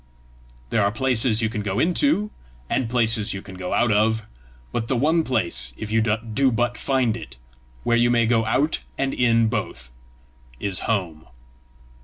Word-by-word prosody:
There 105 - +2
are 100 - +2
places 120 -1 +1
you 110 - +1
can 105 -2 -3
go 100 -1 -3
into, 210 - +1 0.4
and 125 -4 0
places 110 -3 +1
you 95 - -6
can 95 - -11
go 90 -1 -6
out 120 - +2
of; 110 +1 +2 0.5
but 115 - -2
the 130 - 0
one 160 +6 +2
place, 85 - -1
if 110 - -6
you 110 0 +3
do 115 +4 +1
but 120 +1 0
find 130 -3 0
it, 110 - -10 0.5
where 120 0 +2
you 120 0 +3
may 120 -1 +3
go 115 0 +2
out 135 +8 +1 0.2
and 135 0 -1
in 115 -2 +3
both, 65 - -4 0.7
is 100 0 -2
home." 85 -8 -2
115 Hz, 170 wpm, -23 LUFS, 105-125 Hz, 0.7 s, you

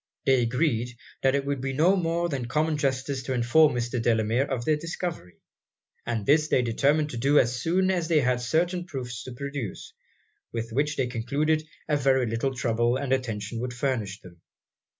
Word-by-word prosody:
They 135 -2 +4
agreed, 120 -1 0 0.2
that 135 0 +3
it 140 0 -1
would 140 -2 -2
be 135 0 -2
no 165 +8 +4
more 170 -1 0
than 135 -7 -3
common 155 +4 +1
justice 135 -1 -1
to 130 +1 -3
inform 125 +4 +4
Mr. 120 0 -2
Delamere 115 +2 +2
of 125 -3 -2
their 155 - +3
discovery; 165 - -5 0.7
and 115 -4 -2
this 150 +4 +4
they 125 - +2
determined 145 +6 +1
to 120 - -5
do 140 +5 +3
as 120 -2 +2
soon 185 +5 +2
as 175 -3 -1
they 160 -3 +3
had 125 -1 +1
certain 175 +7 0
proofs 125 - -6
to 130 - -7
produce, 140 -5 -6 0.6
with 115 0 -4
which 145 +5 0
they 135 - 0
concluded 145 +6 -1 0.2
a 150 -1 +2
very 130 -2 +2
little 115 +4 -1
trouble 120 0 +1
and 135 -1 -1
attention 115 -3 -3
would 125 0 -4
furnish 120 -7 -2
them. 85 -2 -15
130 Hz, 185 wpm, -26 LUFS, 120-150 Hz, 0.7 s, They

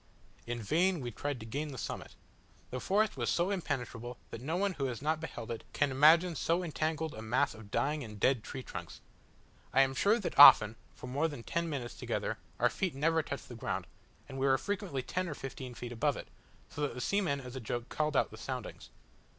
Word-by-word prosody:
In 120 0 -2
vain 175 - +2
we 120 -3 -4
tried 145 +3 -3
to - - -7
gain 140 +7 -3
the 140 -3 -7
summit: - - -5 0.6
the 130 - -3
forest 210 +8 +1
was - - 0
so 175 +3 +1
impenetrable, 125 - -3
that 115 - -6
no 160 +7 -1
one 200 0 +1
who 140 -5 -2
has 125 -3 -3
not 155 +2 0
beheld 120 -8 -6
it 115 - -5
can 145 -2 +2
imagine 160 +6 +6
so 170 +4 +1
entangled 160 -1 -2
a 110 - -7
mass 125 +5 +1
of 110 -2 -12
dying 140 +7 0
and 105 -3 -9
dead 125 0 +3
trunks. 130 -2 -7 0.7
I 135 - +5
am 135 0 +3
sure 205 - +3
that 205 - -3
often, 110 -6 +10 0.2
for - - -9
more 140 +6 0
than 145 -7 -7
ten 170 +4 -1
minutes 125 -8 -4
together, - - -3 0.2
our - - +4
feet 185 -7 -2
never 160 +3 +2
touched 140 -2 -6
the - - -9
ground, 115 -6 -3 0.4
and 135 - -7
we 135 - +2
were 135 0 +5
frequently 190 -10 -3
ten 185 +5 -2
or 150 - -4
fifteen 130 -2 -7
feet 120 0 -6
above 115 -2 0
it, - - -8 0.4
so 150 - -7
that 145 -4 -1
the - - -5
seamen 180 -4 +1
as 125 -1 -9
a - - -3
joke 120 0 -4
called 150 -2 0
out - - +2
the 110 - -10
soundings. 125 +1 -6
140 Hz, 215 wpm, -32 LUFS, 120-160 Hz, 0.7 s, often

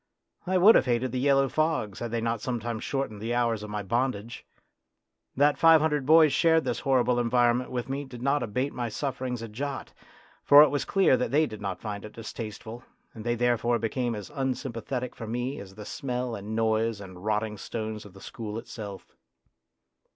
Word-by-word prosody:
I 185 0 +2
would 200 +5 +8
have - - +3
hated 120 +1 0
the 130 - -2
yellow 135 0 +3
fogs 155 -9 -1
had 120 - -4
they 115 0 -2
not 115 -1 -1
sometimes 120 -2 -3
shortened 135 -7 -3
the 115 +2 -2
hours 115 -3 +1
of 105 - -7
my 105 0 -3
bondage. 120 +1 -2 0.9
That 145 +1 +3
five 165 -1 +7
hundred 150 -3 0
boys 155 -1 +6
shared 160 -1 +4
this - - -2
horrible 125 -3 +2
environment 120 +1 +2
with 125 -1 -3
me 140 +2 -3
did 125 -2 -10
not 140 +1 +2
abate 125 +5 -2
my 120 -2 -3
sufferings 125 0 -3
a - - -5
jot; 135 +5 -5 0.5
for 145 +1 +9
it 150 - +4
was 145 - -1
clear 195 -8 +4
that 125 - -1
they 150 +5 +3
did 110 -7 -8
not 95 -3 -4
find 105 -2 -5
it 105 - -9
distasteful, 115 +1 -7 0.3
and 110 - -9
they 120 +1 0
therefore 120 0 +1
became 120 +1 -2
as 105 +6 -8
unsympathetic 130 -2 -3
for 115 - -7
me 125 +4 -3
as 95 -1 -11
the 105 0 -9
smell 125 -2 -3
and 105 +1 -5
noise 110 -1 +1
and 95 -2 -11
rotting 105 0 -1
stones 110 +1 -5
of 105 - -14
the 95 - -13
school 110 -2 -6
itself. 110 -4 -8
120 Hz, 195 wpm, -27 LUFS, 110-135 Hz, 0.9 s, for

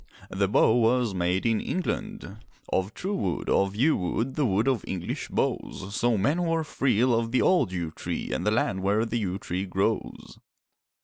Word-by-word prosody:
The 100 +1 +1
bow 105 +2 +4
was 120 -1 +2
made 90 +2 0
in 115 -2 +2
England: 210 - -4 0.4
Of 95 +3 -1
true 195 +3 -3
wood, 95 - -2
of 100 0 +2
yew 145 +9 +3
wood, 115 +8 -2
The 150 -4 +1
wood 105 +4 +1
of 130 -6 +1
English 90 -2 -4
bows; 95 +2 -2
So 120 -2 +2
men 140 - +1
who 170 -2 0
are 165 - 0
free 130 -6 +1
Love 115 -2 +1
the 130 - +2
old 180 - +3
yew 85 -3 -3
tree - - -5
And - - -2
the 105 - +2
land 105 -3 0
where 105 +4 +2
the 115 +1 -2
yew 95 -3 -2
tree 95 0 -4
grows. 95 +4 -2
110 Hz, 190 wpm, -27 LUFS, 95-125 Hz, 0.4 s, bow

